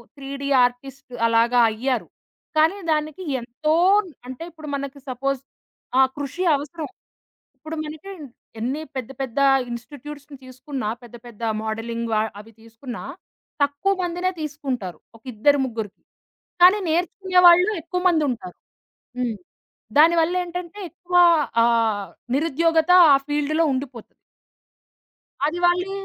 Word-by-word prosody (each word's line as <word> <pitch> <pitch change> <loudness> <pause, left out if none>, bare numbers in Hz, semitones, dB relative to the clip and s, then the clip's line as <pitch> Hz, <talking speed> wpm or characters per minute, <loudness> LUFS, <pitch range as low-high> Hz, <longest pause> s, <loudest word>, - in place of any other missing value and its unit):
3డి 280 0 -6 0.2
artist 250 +2 -4
అలాగా 230 +2 +3
అయ్యారు. 250 +2 -2 0.5
కానీ 320 +6 +4
దానికి 310 +3 -1 0.2
ఎంతో 245 +6 -2 0.5
అంటే 260 +4 -7
ఇప్పుడు 310 -2 -11
మనకి 280 0 -6
సపోజ్ 275 +2 -2 0.6
ఆహ్, 265 -1 +5
కృషి 290 +5 -4
అవసరం. 295 +2 -6 0.7
ఇప్పుడు 315 +1 -7
మనకి 310 +6 -8 0.5
ఎన్ని 260 +7 -2
పెద్ద, 255 -1 -4
పెద్ద 265 0 -3 0.3
ఇన్‌స్టిట్యూట్స్ 285 +4 -9 0.2
తీసుకున్నా 255 -2 -5
పెద్ద, 240 0 -12
పెద్ద 235 -2 -14 0.2
మోడలింగ్ 230 +1 -3
వ - - +2 0.3
అవి 225 +2 -18
తీసుకున్నా 230 +2 -9 0.6
తక్కువ 285 +8 +1
మందినే 355 +1 -1
తీసుకుంటారు. 270 - -4 0.2
ఒక 225 - -29
ఇద్దరు 285 +6 +3
ముగ్గురికి. 225 -5 -6 0.6
కానీ 375 +4 +7
నేర్చుకునే 360 +3 +1
వాళ్ళు 360 +4 +6
ఎక్కువ 360 +3 -3
మందుంటారు. 270 - -1 0.6
హ్మ్. 235 -4 -1 0.6
దానివళ్లేంటంటే 345 +3 +2
ఎక్కువ 355 +1 -6 0.5
ఆహ్, 225 -5 +1 0.3
నిరుద్యోగత 325 +2 +2 0.2
ఆ - - +7
ఫీల్డ్‌లో 295 +2 +1
ఉండిపోతది. 255 -4 -6 1.3
అది 320 +4 0
వాళ్ళు 360 +2 +2
280 Hz, 110 wpm, -23 LUFS, 240-330 Hz, 1.3 s, కానీ